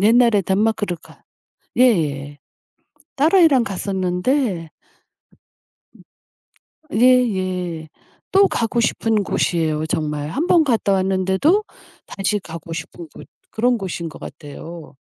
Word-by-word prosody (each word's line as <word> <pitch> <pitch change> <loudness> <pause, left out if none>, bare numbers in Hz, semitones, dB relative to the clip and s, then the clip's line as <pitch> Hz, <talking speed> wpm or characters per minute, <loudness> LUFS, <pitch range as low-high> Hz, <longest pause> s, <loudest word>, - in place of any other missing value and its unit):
옛날에 225 -1 +4
덴마크를 205 -1 0
가 - - -19 0.6
예예. 145 - +1 0.8
딸아이랑 305 -4 +4
갔었는데 190 - -1 2.2
으. - - -9
음. 220 - +1
예예. 185 -10 +2 0.5
또 395 0 +6
가고 235 +1 -1
싶은 225 -2 +1
곳이에요 160 -4 0
정말. 150 -2 -2
1 315 - -2
번 335 -3 +5
갔다 230 -7 +1
왔는데도 190 - +2 0.4
다시 200 +1 -1
가고 165 -2 -8
싶은 170 0 -7
곳 - - -12 0.2
그런 245 +2 +1
곳인 175 -4 -5
것 - - -12
같아요. 160 +1 -10
190 Hz, 220 characters per minute, -20 LUFS, 165-240 Hz, 2.2 s, 또